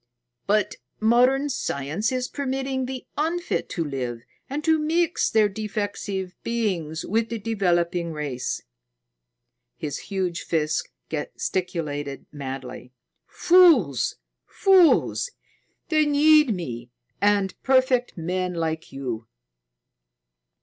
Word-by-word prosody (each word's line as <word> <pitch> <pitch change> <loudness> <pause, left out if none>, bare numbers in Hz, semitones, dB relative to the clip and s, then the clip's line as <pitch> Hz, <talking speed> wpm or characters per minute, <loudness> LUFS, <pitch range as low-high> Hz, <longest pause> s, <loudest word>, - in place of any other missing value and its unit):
But 210 0 +1 0.2
modern 250 +5 +4
science 180 - -2
is 255 -1 -1
permitting 265 -1 -2
the 260 -1 -6
unfit 340 +3 -1
to 170 - -2
live 125 -5 -4 0.3
and 290 +3 -3
to 320 0 +3
mix 330 +2 +1
their 220 -1 +4
defective 205 -2 -4
beings 185 -9 -2
with 225 +3 0
the 230 - -3
developing 175 -5 0
race!" 145 -5 -3 1.1
His 145 -2 -4
huge 185 -3 -1
fist 155 -2 -1 0.2
gesticulated 150 -3 -3
madly. 130 -3 -7 0.3
"Fools! 320 - +4 0.3
Fools! 385 +4 +4 0.6
They 310 -2 +3
need 300 -1 +5
me 120 -9 -6 0.3
and 200 -1 +3
perfect 260 -3 +2
men 180 +2 -2
like 160 -1 -3
you." 125 -5 -5
200 Hz, 100 wpm, -24 LUFS, 155-260 Hz, 1.1 s, need